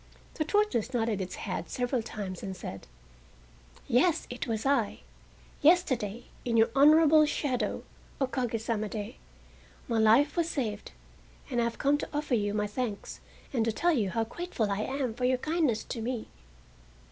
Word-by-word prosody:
The 310 Hz, -, -1 dB
tortoise 310 Hz, -, +1 dB
nodded 225 Hz, -4 st, 0 dB
its 185 Hz, 0 st, -5 dB
head 180 Hz, -4 st, -4 dB
several 245 Hz, 0 st, -1 dB
times 195 Hz, -4 st, -6 dB
and 190 Hz, -1 st, -5 dB
said: 95 Hz, -, -8 dB, 1.0 s
"Yes, 320 Hz, +7 st, +3 dB
it 245 Hz, -, -4 dB
was 220 Hz, 0 st, -2 dB
I. 270 Hz, -6 st, +1 dB, 0.6 s
Yesterday 260 Hz, -, +3 dB, 0.2 s
in 235 Hz, -2 st, 0 dB
your 225 Hz, 0 st, +4 dB
honorable 305 Hz, +2 st, +7 dB
shadow 265 Hz, -4 st, -1 dB, 0.4 s
(o 270 Hz, -, +3 dB
kage 245 Hz, -3 st, -2 dB
sama 215 Hz, -1 st, -2 dB
de) 210 Hz, -1 st, -6 dB, 0.7 s
my 230 Hz, -1 st, +1 dB
life 230 Hz, +7 st, +5 dB
was 335 Hz, -1 st, +1 dB
saved, 220 Hz, -9 st, -3 dB, 0.6 s
and 240 Hz, -, +1 dB
I -, -, +2 dB
have 235 Hz, -, -3 dB
come 285 Hz, +1 st, +2 dB
to -, -, -5 dB
offer 295 Hz, -2 st, -2 dB
you 205 Hz, -3 st, +1 dB
my 210 Hz, 0 st, +1 dB
thanks 210 Hz, 0 st, -4 dB, 0.3 s
and 235 Hz, -4 st, +2 dB
to 225 Hz, -, +1 dB
tell 345 Hz, +10 st, +2 dB
you 215 Hz, -9 st, +1 dB
how 225 Hz, +4 st, 0 dB
grateful 225 Hz, -, -3 dB
I 200 Hz, -, -1 dB
am 260 Hz, 0 st, -2 dB
for 250 Hz, +2 st, -2 dB
your 255 Hz, 0 st, +3 dB
kindness 305 Hz, -5 st, 0 dB
to 235 Hz, -, -5 dB
me." 235 Hz, 0 st, -3 dB
240 Hz, 170 wpm, -29 LUFS, 215-285 Hz, 1.0 s, honorable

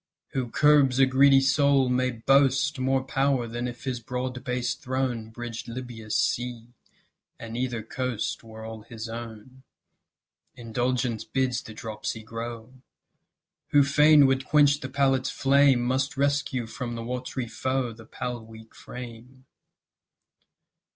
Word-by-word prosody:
Who 130 Hz, -3 st, -3 dB
curbs 145 Hz, -2 st, +4 dB
a 135 Hz, -, +6 dB
greedy 135 Hz, +1 st, +5 dB
soul 140 Hz, -1 st, +3 dB
may 125 Hz, 0 st, +1 dB
boast 135 Hz, +4 st, +2 dB
More 130 Hz, 0 st, +1 dB
power 135 Hz, -2 st, +1 dB
than 120 Hz, +2 st, -4 dB
if 120 Hz, 0 st, -8 dB
his 130 Hz, -3 st, -3 dB
broad 125 Hz, +1 st, -4 dB
based 125 Hz, -1 st, -2 dB
throne 125 Hz, -3 st, -2 dB
Bridged 120 Hz, 0 st, -7 dB
Libya's 115 Hz, -3 st, -6 dB
sea, 120 Hz, -1 st, -1 dB, 0.7 s
and 115 Hz, 0 st, -7 dB
either 120 Hz, -2 st, -2 dB
coast 125 Hz, -1 st, -3 dB
Were 110 Hz, -1 st, -10 dB
all 110 Hz, -1 st, -7 dB
his 115 Hz, 0 st, -8 dB
own. 115 Hz, +2 st, -9 dB, 0.9 s
Indulgence 120 Hz, 0 st, -1 dB
bids 125 Hz, +1 st, -1 dB
the 110 Hz, -, -11 dB
dropsy 110 Hz, 0 st, -5 dB
grow; 115 Hz, +2 st, -7 dB, 0.9 s
Who 145 Hz, -1 st, +5 dB
fain 150 Hz, +1 st, +6 dB
would 135 Hz, 0 st, +2 dB
quench 145 Hz, 0 st, +4 dB
the 130 Hz, -, -6 dB
palate's 135 Hz, -1 st, +1 dB
flame 135 Hz, -2 st, +4 dB
Must 130 Hz, +2 st, -1 dB
rescue 140 Hz, -3 st, 0 dB
from 120 Hz, +2 st, -5 dB
the 115 Hz, -, -5 dB
watery 125 Hz, +1 st, -4 dB
foe 130 Hz, +1 st, -2 dB
The 110 Hz, 0 st, -14 dB
pale 120 Hz, -2 st, -5 dB
weak 110 Hz, 0 st, -14 dB
frame. 125 Hz, +1 st, -11 dB
125 Hz, 135 wpm, -26 LUFS, 115-135 Hz, 0.9 s, a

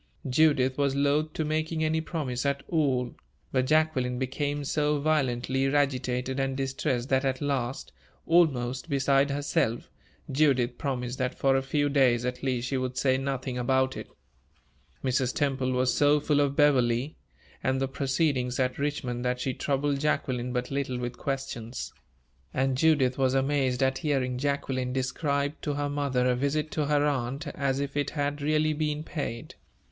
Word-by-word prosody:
Judith 130 Hz, -1 st, +3 dB
was 140 Hz, -1 st, +2 dB
loath 145 Hz, +2 st, +1 dB
to 155 Hz, -, -2 dB
making 155 Hz, +1 st, -1 dB
any 160 Hz, +1 st, +1 dB
promise 145 Hz, -7 st, -3 dB
at 140 Hz, -1 st, -1 dB
all, 130 Hz, -7 st, +1 dB, 0.4 s
but 130 Hz, -1 st, +1 dB
Jacqueline 145 Hz, -5 st, +2 dB
became 145 Hz, +3 st, -2 dB
so 150 Hz, +1 st, +1 dB
violently 135 Hz, -3 st, +1 dB
agitated 130 Hz, -2 st, 0 dB
and 135 Hz, 0 st, -1 dB
distressed 135 Hz, -2 st, -1 dB
that 130 Hz, 0 st, +2 dB
at 130 Hz, -1 st, 0 dB
last, 130 Hz, -, -2 dB, 0.3 s
almost 135 Hz, -5 st, +2 dB
beside 140 Hz, 0 st, +3 dB
herself, 140 Hz, -5 st, -1 dB, 0.4 s
Judith 130 Hz, -4 st, +2 dB
promised 125 Hz, -2 st, -3 dB
that 130 Hz, -1 st, -1 dB
for 135 Hz, -1 st, +3 dB
a 135 Hz, -, +2 dB
few 145 Hz, +2 st, 0 dB
days, 130 Hz, -4 st, +3 dB
at 125 Hz, 0 st, -3 dB
least, 125 Hz, -2 st, -1 dB
she 135 Hz, -, -1 dB
would 130 Hz, 0 st, -3 dB
say 130 Hz, 0 st, +3 dB
nothing 130 Hz, -1 st, -3 dB
about 130 Hz, +1 st, +1 dB
it. -, -, -7 dB, 1.0 s
Mrs. 130 Hz, -1 st, 0 dB
Temple 135 Hz, -2 st, 0 dB
was 125 Hz, 0 st, +2 dB
so 145 Hz, +1 st, +4 dB
full 145 Hz, 0 st, +1 dB
of 140 Hz, -1 st, +1 dB
Beverley, 135 Hz, -2 st, +3 dB, 0.5 s
and 130 Hz, 0 st, +1 dB
the 135 Hz, -, 0 dB
proceedings 135 Hz, -2 st, 0 dB
at 130 Hz, 0 st, 0 dB
Richmond, 135 Hz, -4 st, -2 dB
that 125 Hz, 0 st, 0 dB
she 130 Hz, 0 st, -1 dB
troubled 140 Hz, +1 st, -1 dB
Jacqueline 125 Hz, -4 st, -1 dB
but 125 Hz, +1 st, -2 dB
little 135 Hz, -2 st, -2 dB
with 120 Hz, 0 st, -4 dB
questions; 130 Hz, -4 st, -4 dB, 0.6 s
and 135 Hz, 0 st, +1 dB
Judith 135 Hz, -3 st, +3 dB
was 130 Hz, 0 st, +2 dB
amazed 135 Hz, -2 st, +1 dB
at 130 Hz, 0 st, +1 dB
hearing 130 Hz, -4 st, 0 dB
Jacqueline 130 Hz, -2 st, -1 dB
describe 140 Hz, +2 st, -1 dB
to 145 Hz, -2 st, -2 dB
her 145 Hz, 0 st, -1 dB
mother 140 Hz, -3 st, 0 dB
a 125 Hz, -, +3 dB
visit 145 Hz, +4 st, -1 dB
to 150 Hz, -2 st, -1 dB
her 145 Hz, 0 st, +3 dB
aunt, 135 Hz, +1 st, -1 dB
as 140 Hz, -1 st, -1 dB
if 140 Hz, 0 st, -3 dB
it 145 Hz, -1 st, 0 dB
had 145 Hz, -1 st, -2 dB
really 155 Hz, +1 st, +2 dB
been 150 Hz, 0 st, -2 dB
paid. 140 Hz, -7 st, -5 dB
135 Hz, 160 wpm, -28 LUFS, 125-145 Hz, 1.0 s, so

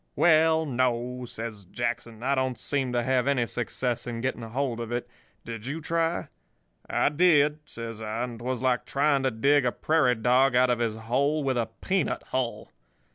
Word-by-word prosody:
"'Well, 160 Hz, -1 st, +4 dB
no,' 125 Hz, -1 st, -1 dB
says 110 Hz, -4 st, -7 dB
Jackson. 115 Hz, +2 st, -4 dB
'I 135 Hz, +2 st, +2 dB
don't 130 Hz, -2 st, -1 dB
seem 135 Hz, -3 st, -1 dB
to 120 Hz, -1 st, 0 dB
have 130 Hz, +1 st, +1 dB
any 135 Hz, -4 st, +2 dB
success 120 Hz, +1 st, -3 dB
in 120 Hz, -1 st, -4 dB
getting 130 Hz, 0 st, -2 dB
hold 120 Hz, +1 st, -2 dB
of 115 Hz, 0 st, -5 dB
it. 120 Hz, 0 st, -2 dB, 0.4 s
Did 115 Hz, 0 st, -7 dB
you 150 Hz, +4 st, -3 dB
try?' 165 Hz, +1 st, -1 dB, 0.6 s
"'I -, -, +2 dB
did,' 150 Hz, -2 st, +4 dB
says 115 Hz, -1 st, -7 dB
I, 110 Hz, +2 st, -3 dB
'and 120 Hz, -2 st, -6 dB
'twas 125 Hz, +1 st, -3 dB
like 125 Hz, -2 st, +1 dB
trying 140 Hz, 0 st, +2 dB
to 135 Hz, -, +2 dB
dig 140 Hz, +5 st, +3 dB
a 125 Hz, -, +1 dB
prairie 150 Hz, -5 st, +2 dB
dog 125 Hz, +3 st, +3 dB
out 125 Hz, 0 st, +4 dB
of 120 Hz, -, 0 dB
his 115 Hz, -2 st, 0 dB
hole 140 Hz, +7 st, 0 dB
with 135 Hz, -1 st, 0 dB
a 115 Hz, -2 st, -1 dB
peanut 190 Hz, -4 st, 0 dB
hull. 130 Hz, -2 st, -2 dB
125 Hz, 185 wpm, -27 LUFS, 120-140 Hz, 0.6 s, Well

